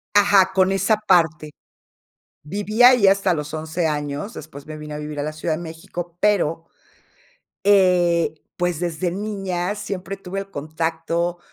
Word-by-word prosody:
Ajá, 200 -2 +5
con 190 0 +3
esa 205 +2 +2
parte. 160 -7 +2 0.9
Viví 205 +7 -1
ahí 245 -4 +7
hasta 195 -2 +3
los 150 -1 -5
11 160 +2 -2
años, 150 +7 -3
después 145 -2 -10
me 155 0 -7
vine 150 0 -8
a 150 - -5
vivir 150 0 -6
a - - -1
la 155 - -3
Ciudad 155 +1 -2
de 170 - -7
México, 170 +1 -7
pero, 170 -6 +1 1.0
eh, 180 -5 +4 0.2
pues, 175 -3 -1
desde 170 0 -2
niña 195 -2 -3
siempre 195 -1 -5
tuve 195 0 -5
el 195 0 -8
contacto 165 +2 -2
175 Hz, 150 wpm, -22 LUFS, 155-195 Hz, 1.0 s, ahí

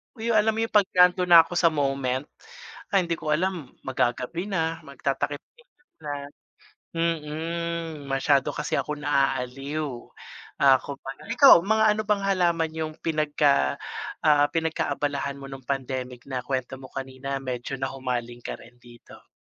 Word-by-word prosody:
Uy, 230 0 -2
yung 220 - +5
alam 220 +1 +2
mo 225 - 0
yung 225 - -3
'pag 205 -3 +4
nando'n 180 0 +5
na 170 -2 +9
ako 165 - -17
sa 170 - +5
moment? 135 -4 0 0.7
Ah, 195 - +4
hindi 170 -1 -1
ko 155 - -2
alam, 175 -5 -3
maggagabi 130 +7 -1
na, 165 -4 -1
magtatakip-silim 140 - -4 0.3
na 150 -2 -5 0.8
mm, 165 -1 -3
masyado 135 0 +2
kasi - - -2
ako 150 - -4
naaaliw. 135 0 -1 0.5
Ako 140 +1 +4
panay 135 +11 -7
ikaw, 275 - +9
mga 220 +4 +2
ano - - -1
bang 205 -1 +2
halaman 170 -4 +1
yung 160 -1 -3
pinagka, 150 - +2 0.5
ah, 145 -2 +5
pinagkaabalahan 145 -4 -1
mo 135 - -8
nung 135 -1 -9
pandemic 130 -2 -3
na 130 -2 -2
kwento 130 -1 -3
mo 130 - -10
kanina 135 +1 -5
medyo 130 +1 -4
nahumaling 125 -3 -4
ka - - -4
rin 120 +1 -16
dito? 120 -1 -16
145 Hz, 145 wpm, -25 LUFS, 135-170 Hz, 0.8 s, na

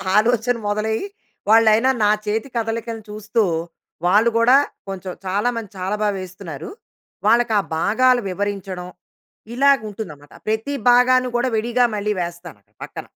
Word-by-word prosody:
ఆలోచన 240 +2 +3
మొదలయ్యి 215 - -1 0.4
వాళ్ళైనా 225 +2 +5
నా 210 - +4 0.2
చేతి 220 +5 -2
కదలికలు 225 0 -3
చూస్తూ, 215 +2 -1 0.6
వాళ్ళు 210 +6 +4
గూడా 240 +3 +5 0.3
కొంచెం 190 -1 -5
చాలా 200 +6 0
మంది 225 -4 -5
చాలా 190 +3 -2
బాగా 210 -1 +1
వేస్తున్నారు. 180 -5 -8 0.6
వాళ్ళకి 235 -1 +3
ఆ - - +2 0.2
భాగాలు 250 +8 +3
వివరించడం. 190 -2 -4 0.7
ఇలాగా 275 -3 +4
ఉంటుంది 210 -4 -6
అనమాట. 145 0 -18
ప్రతి 220 +6 -1 0.2
భాగాన్ని 250 +1 +5
కూడా 250 +2 +1
విడిగా 240 +3 +1
మళ్ళీ 210 +1 -1
వేస్తాను, 170 - -7 0.2
పక్కన. - - -8
215 Hz, 130 wpm, -21 LUFS, 195-240 Hz, 0.7 s, వాళ్ళైనా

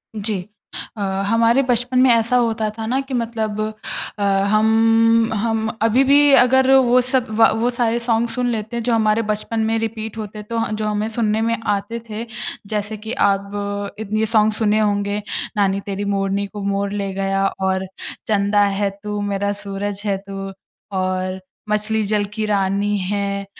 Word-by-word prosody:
जी 205 -3 -3 0.5
अ, - - -5 0.2
हमारे 230 +4 +3
बचपन 245 +1 +2
में 260 0 +6
ऐसा 230 +1 +3
होता 225 -2 +1
था 225 - -4
ना 250 +4 0
कि 270 0 -8
मतलब 225 -3 -2 0.6
अ, - - 0
हम 225 +3 +3
हम 220 +1 0
अभी 230 +4 +4
भी 285 +1 +5
अगर 260 +1 +4
वो 255 -1 +5
सब 255 0 0
वा 225 0 +6
वो 240 - +2
सारे 235 -1 +1
सॉन्ग 235 0 0
सुन 250 0 -1
लेते 220 +1 -4
हैं 235 - -2
जो 240 +1 +1
हमारे 220 0 +2
बचपन 215 +2 -3
में 225 - +1
रिपीट 225 0 -4
होते 210 -1 -6
तो 230 +2 -5
ह 225 - -1
जो 215 0 -2
हमें 210 0 -1
सुनने 220 -1 0
में 230 +1 +1
आते 205 +3 -1
थे। 215 +2 -5 0.4
जैसे 210 +1 -3
कि 220 +2 -7
अब 200 0 +1 0.5
इतने 215 0 -1
सॉन्ग 215 -1 +3
सुने 215 0 +2
होंगे 205 -1 0 0.4
नानी 195 -1 +2
तेरी 200 0 -3
मोरनी 200 0 0
को 205 +1 -8
मोर 200 0 -1
ले 200 -1 -3
गया 195 0 0 0.2
और 190 0 0 0.4
चंदा 205 -1 +3
है 200 0 +1
तू 210 0 -3
मेरा 200 0 -1
सूरज 200 0 -4
है 200 -2 +1
तू 195 0 -5 0.5
और 185 0 -1 0.3
मछली 215 +1 +1
जल 210 0 +1
की 215 0 -2
रानी 200 0 +1
है, 200 +1 -2
215 Hz, 175 wpm, -20 LUFS, 200-230 Hz, 0.6 s, में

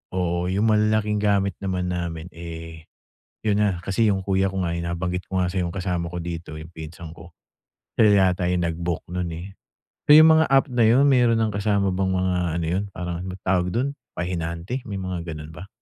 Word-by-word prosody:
oo, 90 -1 0
yung 95 +3 0
malalaking 105 0 +2
gamit 100 -2 +1
naman 90 -2 -2
namin, 85 -1 -4
eh, 80 -1 -9 0.6
'yon 105 -2 +2
na, 100 -4 +1
kasi 100 +4 +1
'yong 95 -2 +1
kuya 95 0 +1
ko 95 0 -2
nga 85 - -1
ay - - -3
nabanggit 90 +1 -2
ko 95 - -1
nga, 90 0 0
sa 95 - -1
'yong 85 -1 -1
kasama 90 -3 -2
ko 90 - -4
dito, 85 -2 -6
'yong 80 +1 -10
pinsan 80 0 -9
ko. 85 +1 -13 0.7
Sila 100 -4 +5
yata 90 -1 -2
yung 90 -1 +1
nag-book 85 0 -3
no'n, 90 0 -3
eh. 85 +3 -7 0.6
So 150 - +9
'yong 155 +1 +9
mga 160 0 +5
app 135 0 +4
na 120 -2 +3
'yon, 125 +5 +5
meron 120 -3 +4
ng 110 -1 0
kasama 100 -1 +1
bang 95 0 0
mga 95 0 +1 0.2
ano - - -2
'yon, 90 +5 -1
parang 90 -1 -4 0.3
tawag 90 -1 +1
do'n, 135 +4 0 0.2
pahinante? 85 +6 -3
May 100 - -4
mga 90 -2 -4
ganun 75 +1 -9
ba? 90 +5 -10
90 Hz, 200 wpm, -23 LUFS, 85-100 Hz, 0.7 s, So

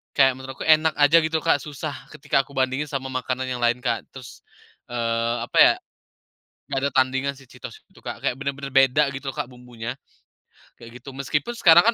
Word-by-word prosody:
Kayak, 135 -2 +5
menurutku 130 +1 -8
enak 160 0 +5
aja, 145 +3 +6
gitu 160 0 0
loh - - -15
Kak, 145 - +4
susah 145 -3 -6 0.2
ketika 135 - 0
aku - - -19
bandingin 130 +3 0
sama 135 -2 -4
makanan 130 0 -3
yang 125 -1 -3
lain 120 +1 +2
Kak. 120 -3 -1
Terus, 125 -4 -12 0.5
eee, 115 0 0
apa - - -4
ya, - - +6 0.9
nggak 135 -1 -1
ada 140 - +1
tandingan 130 +2 +1
si 135 -2 -16
Cheetos - - -11
itu - - -20
Kak, - - -6
kayak, 125 - 0
benar-benar 140 0 -4
beda 135 +2 +5
gitu 135 0 -5
loh - - -18
Kak, - - -3
bumbunya, 125 -1 -8 0.8
kayak 115 +1 -12
gitu. 135 - -9
Meskipun, 145 - -2
sekarang 175 -5 +7
135 Hz, 190 wpm, -23 LUFS, 125-140 Hz, 0.9 s, sekarang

